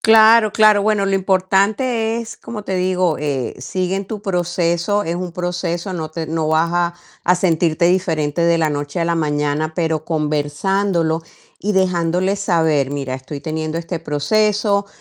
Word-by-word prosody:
Claro, 220 -1 +6
claro. 215 -2 +5
Bueno, 210 -1 +1
lo 195 - +1
importante 200 +5 +1
es, 230 -1 -7
como 210 -3 -8
te 190 - -3
digo, 185 -2 +1
eh, 140 -4 -2
sigue 185 +7 -2
en 195 +1 -2
tu 210 -1 -6
proceso, 175 +1 0
es 170 - -2
un 180 0 -4
proceso, 175 +1 -3
no 160 -3 -4
te 160 0 -5
no 160 0 -1
vas 160 +2 +2
a 175 0 0 0.3
a 180 +1 +3
sentirte 170 -2 +1
diferente 165 -4 0
de 170 0 +3
la 160 -1 +2
noche 145 +2 -3
a 170 - +1
la 170 0 +1
mañana, 150 0 -1
pero 160 -3 -1
conversándolo 160 +3 0 0.4
y 205 - -1
dejándoles 185 +1 +1
saber: 160 -7 +1
"Mira, 135 -2 -3
estoy 135 +2 -7
teniendo 155 0 -3
este 170 0 -5
proceso, 200 +7 +1
175 Hz, 165 wpm, -19 LUFS, 155-195 Hz, 0.4 s, Claro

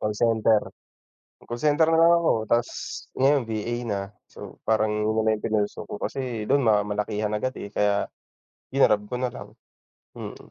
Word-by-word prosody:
call 105 0 -1
center. 110 -1 +3 0.9
Call 120 - -4
center 155 +1 +3
na 165 - +3
lang 170 +1 +7
ako 165 - +3 0.2
tapos 120 0 +2 0.5
ngayon 135 0 +4
VA 110 +2 -2
na. 100 -2 -1 0.3
So, - - -11
parang 110 -1 +2
'yun 105 +1 0
naman 110 -1 +1
'yung - - -4
pinursue 105 -2 -1 0.2
kasi 125 -5 -3
dun 140 +4 +3
ma 105 -1 +4
malakihan 105 0 -2
agad, 130 +5 -2
eh, 100 - -7
kaya 105 0 +1 0.7
grinab 120 -6 +4
ko - - -3
nalang, 125 -2 -4 0.7
mm. - - -7
110 Hz, 160 wpm, -25 LUFS, 105-130 Hz, 0.9 s, lang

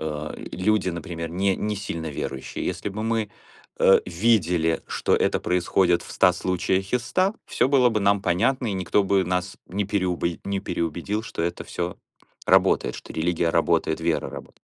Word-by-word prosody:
э, 75 -1 -4 0.2
люди, 95 -1 +1
например, 85 -1 -5
не 95 +2 +1
не 105 0 -2
сильно 85 -5 -5
верующие, 70 -1 -5
если 105 - -3
бы 105 +2 -5
мы, 110 -2 -1 0.5
э, 95 - +6
видели, 85 -4 +2
что - - +1
это - - +1
происходит 90 0 +2
в - - -12
100 90 - +4
случаях 95 +2 -1
из 125 - +2
100, 190 +3 +1
всё - - +1
было 130 -3 +5
бы 110 -2 0
нам 100 0 +3
понятно, 125 +9 +1
и 100 - -2
никто 95 +2 +1
бы 95 -1 +2
нас 90 +2 -2
не 100 +3 -2
переубе 90 -3 -1
не 100 -1 -2
переубедил, 85 +6 -2
что 105 -6 -5
это 85 - -3
всё 90 0 -4 0.5
работает, - - +3
что - - -9
религия 85 +1 0
работает, - - +1
вера - - 0
работа - - -11
95 Hz, 170 wpm, -24 LUFS, 85-105 Hz, 0.5 s, э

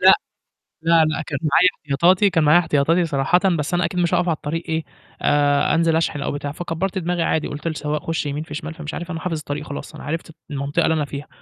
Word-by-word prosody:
لأ، - - +8 0.7
لا، 165 -1 +4
لأ، 155 +1 -1
كان 145 -3 -4
معايا 160 +4 +5
احتياطاتي، 175 +7 +3
كان 165 -3 +2
معايا 155 +3 +6
احتياطاتي 165 +1 +2
صراحةً 145 +4 +2 0.2
بس 150 +4 -2
أنا 175 -1 +2
أكيد 180 - -2
مش 175 0 +1
هاقف 180 0 +2
على 165 - +2
الطريق 160 +3 -4
إيه، 160 0 0 0.4
آآ، 145 0 +3
أنزل 165 0 +3
أشحن 160 -3 0
أو - - -2
بتاع 145 0 -4
فكبّرت 175 +4 -3
دماغي 175 -1 0
عادي 160 - 0
قُلت 150 +3 -6
لسوّاق 150 -1 -2
"خُش 165 -1 -2
يمين 145 +1 -3
في 155 - -10
شمال،" 155 +1 -5
فمش 155 -2 -7
عارف 175 +1 -5
أنا 165 - -4
حافظ 165 -1 -2
الطريق 150 0 -5
خلاص، 145 - -7
أنا - - -10
عرفت 165 +2 -4 0.2
المنطقة 145 +4 0
اللي - - +3
أنا 155 -2 0
فيها. 145 +1 -7
160 Hz, 230 wpm, -21 LUFS, 145-170 Hz, 0.7 s, لأ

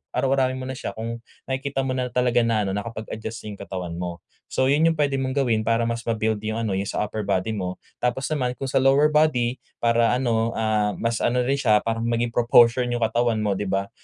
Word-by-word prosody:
araw-arawin 130 0 +1
mo 130 - -5
na 130 - -4
siya, - - -5
kung 115 +1 -4 0.3
nakikita 135 +1 -2
mo 130 - -1
na 130 -1 -1
talaga 125 0 +2
na 115 -2 +1
ano 95 - -2
nakapag-adjust 110 +1 -5
na - - -6
yung 100 - -13
katawan 90 -3 -5
mo. 85 -2 -5 0.2
So, 130 0 0
yun 150 +3 +3
yung 165 - +3
puwede 140 -2 +1
mong 130 0 -2
gawin 115 -4 +1
para 115 +1 +2
mas 115 0 -2
ma-build 110 -1 0
yung 110 +1 -2
ano, 110 -4 -1
'yong 100 - -1
sa - - -1
upper 105 0 -5
body 95 +1 0
mo. 90 -3 -4 0.2
Tapos 125 +2 0
naman 125 -5 0
kung 135 - -4
sa - - +1
lower 135 +3 +5
body 130 -5 +2 0.2
para 115 0 +3
ano, 115 -2 0
ah, 110 -2 +1
mas 115 -1 -1
ano 125 +1 +2
rin 135 +2 +1
siya 110 -6 +4
para 115 0 -1
maging 115 +1 0
proportion 120 +1 +5
yung 120 -1 -2
katawan 115 0 +1
mo, 105 -2 +1
'di 105 - -3
ba? 100 +1 -1
115 Hz, 225 wpm, -24 LUFS, 110-130 Hz, 0.3 s, lower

